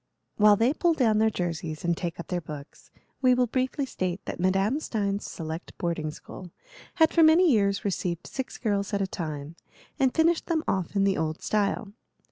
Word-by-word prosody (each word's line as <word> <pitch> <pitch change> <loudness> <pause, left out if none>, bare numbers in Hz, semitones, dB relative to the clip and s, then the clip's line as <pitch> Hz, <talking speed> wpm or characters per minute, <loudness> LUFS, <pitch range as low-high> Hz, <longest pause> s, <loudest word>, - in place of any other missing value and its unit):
While 210 0 +6
they 230 +6 +2
pull 335 +1 +2
down 225 -7 +3
their 220 0 +4
jerseys 165 -5 -4
and 170 0 +2
take 170 -1 -5
up 170 - -7
their 180 -2 -1
books, 150 -2 -10 0.3
we 255 -2 +5
will 250 0 +3
briefly 260 +4 -1
state 185 -7 -3
that - - -5
Madame 195 +9 +2
Stein's 205 -8 -2
select 160 +1 -7
boarding 170 -3 -2
school 175 +4 -10 0.5
had 320 -1 +4
for 335 - +4
many 325 +2 +6
years 200 -4 +1
received 180 -3 -2
six 265 -2 -5
girls 205 -2 -1
at 200 - 0
a - - +1
time, 155 -4 -6 0.4
and 265 -1 +3
finished 330 +2 +2
them 320 -2 0
off 190 0 -1
in 200 - +3
the 195 -1 +2
old 155 0 -3
style. 205 0 -1
200 Hz, 190 wpm, -27 LUFS, 170-255 Hz, 0.5 s, While